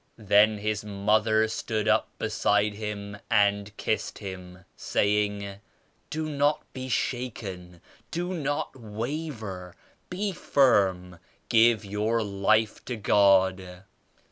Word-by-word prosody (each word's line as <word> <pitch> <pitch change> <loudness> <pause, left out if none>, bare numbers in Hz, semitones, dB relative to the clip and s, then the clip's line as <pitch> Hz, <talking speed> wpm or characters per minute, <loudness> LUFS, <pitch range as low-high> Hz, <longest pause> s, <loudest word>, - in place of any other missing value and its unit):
Then 105 0 +4
his 105 0 -2
mother 110 +2 +2
stood 110 -1 -3
up - - +3
beside 105 0 +1
him 105 -1 -6
and 100 -2 +2
kissed - - -2
him, 90 -2 -9
saying 100 -1 0 0.5
*Do 155 0 -3
not 150 0 +1
be 130 0 -6
shaken! 100 -9 -4 0.3
Do 175 +2 -3
not 145 -5 -2
waver! 110 - -6 0.3
Be 200 +3 -2
firm! 95 - +2 0.3
Give 115 -1 +4
your 105 +3 0
life 105 +2 +1
to 125 - -3
God! 95 -3 +2
105 Hz, 105 wpm, -27 LUFS, 100-120 Hz, 0.5 s, Then